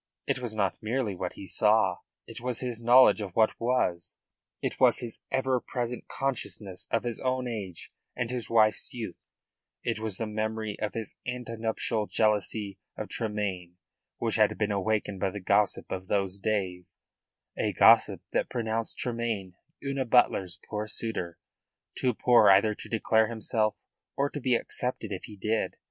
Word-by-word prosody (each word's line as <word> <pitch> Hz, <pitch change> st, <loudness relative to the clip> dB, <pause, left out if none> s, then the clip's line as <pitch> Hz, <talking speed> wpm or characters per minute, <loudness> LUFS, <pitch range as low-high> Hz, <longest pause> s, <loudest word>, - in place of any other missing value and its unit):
It -, -, 0 dB
was 120 Hz, -3 st, -5 dB
not 100 Hz, -3 st, 0 dB
merely 110 Hz, -1 st, -1 dB
what 90 Hz, -1 st, -4 dB
he 100 Hz, -, -9 dB
saw, 105 Hz, -2 st, +3 dB, 0.3 s
it -, -, -9 dB
was 125 Hz, -1 st, -1 dB
his 120 Hz, -3 st, -3 dB
knowledge 120 Hz, -2 st, +7 dB
of 95 Hz, -3 st, -6 dB
what 110 Hz, -1 st, +5 dB
was; 115 Hz, -8 st, 0 dB, 0.4 s
it -, -, -3 dB
was -, -, +5 dB
his 115 Hz, -2 st, -6 dB
ever 130 Hz, -1 st, +1 dB
present 125 Hz, -1 st, -4 dB
consciousness 110 Hz, -8 st, -3 dB
of 115 Hz, -, +1 dB
his 120 Hz, -2 st, -3 dB
own 130 Hz, -1 st, -1 dB
age 100 Hz, -7 st, -6 dB, 0.2 s
and 120 Hz, -1 st, -2 dB
his 125 Hz, -2 st, -3 dB
wife's 110 Hz, 0 st, +3 dB
youth; 110 Hz, -7 st, -7 dB, 0.5 s
it 115 Hz, -2 st, -1 dB
was 110 Hz, -3 st, -4 dB
the 115 Hz, -, -2 dB
memory 110 Hz, 0 st, -2 dB
of 105 Hz, -, -3 dB
his 110 Hz, -2 st, -4 dB
ante 125 Hz, -2 st, -4 dB
nuptial 110 Hz, -1 st, -1 dB
jealousy 105 Hz, -2 st, 0 dB, 0.2 s
of -, -, -5 dB
Tremayne 100 Hz, -5 st, -3 dB, 0.4 s
which -, -, 0 dB
had -, -, +3 dB
been 105 Hz, -1 st, 0 dB
awakened 100 Hz, 0 st, 0 dB
by 95 Hz, -, +1 dB
the 100 Hz, -, -6 dB
gossip 100 Hz, +2 st, +1 dB
of 95 Hz, 0 st, -4 dB
those 100 Hz, -1 st, 0 dB
days 95 Hz, -4 st, -2 dB, 0.6 s
a -, -, 0 dB
gossip -, -, +6 dB
that -, -, 0 dB
pronounced 115 Hz, -1 st, -2 dB
Tremayne 115 Hz, -6 st, -2 dB, 0.3 s
Una 135 Hz, -1 st, -1 dB
Butler's 105 Hz, -7 st, +3 dB
poor 105 Hz, 0 st, -3 dB
suitor, 100 Hz, -6 st, -3 dB, 0.6 s
too 125 Hz, -3 st, 0 dB
poor 120 Hz, -4 st, +6 dB
either 100 Hz, +3 st, +6 dB
to -, -, -8 dB
declare 110 Hz, -1 st, +3 dB
himself 110 Hz, -1 st, -1 dB, 0.3 s
or 140 Hz, +1 st, +1 dB
to 145 Hz, -, -4 dB
be 125 Hz, -1 st, +3 dB
accepted 125 Hz, 0 st, -2 dB
if 95 Hz, -, -4 dB
he 105 Hz, -, -11 dB
did. 110 Hz, +3 st, -1 dB
110 Hz, 165 wpm, -28 LUFS, 100-120 Hz, 0.6 s, knowledge